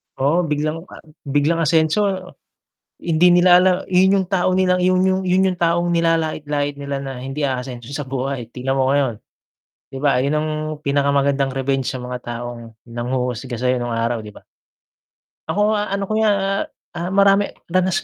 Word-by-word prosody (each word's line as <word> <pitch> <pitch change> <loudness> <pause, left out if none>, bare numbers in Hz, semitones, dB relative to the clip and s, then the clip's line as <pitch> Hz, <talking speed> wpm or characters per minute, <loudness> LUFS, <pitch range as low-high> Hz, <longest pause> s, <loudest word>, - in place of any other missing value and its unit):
Oo, 165 +6 +1
biglang 155 +2 -2
a - - -13 0.3
biglang 145 +4 +1
asenso, 160 +5 +2 0.9
hindi 170 +1 +3
nila 175 0 +6
alam 185 0 +4
yun 190 +1 +4
yung 185 - -5
tao 185 -1 +1
nilang 180 -1 +2
yun 185 0 +3
yun 190 0 +2
yun 185 +1 +3
yung - - -12
taong 170 +1 +1
nilalait-lait 155 -3 0
nila 140 -1 -4
na 135 -2 -6
hindi 135 +3 -5
aasenso 125 -3 -4
sa 145 -1 -4
buhay, 135 -1 -3
tignan 135 +1 -2
mo 130 0 +2
ngayon. 135 -6 +1 0.7
'Di 135 - -7
ba 140 -2 +2
yun 140 +3 0
ang 155 +1 -2 0.3
pinakamagandang 140 -1 +1
revenge 135 -1 -1
sa 130 - -5
mga 125 0 -5
taong 120 0 -6 0.3
nanghuhusga 125 0 -3
sayo 125 0 +1
nung 120 -1 -3
araw 115 +1 -1
'di 105 - -9
ba? - - -14 1.1
Ako 210 +1 +1
ano 200 -1 -2
ko 195 - -3
yan, 195 -2 +1 0.2
ah, 175 0 -4
marami 200 +1 +4 0.2
danas 185 0 +1
145 Hz, 165 wpm, -20 LUFS, 130-180 Hz, 1.1 s, nila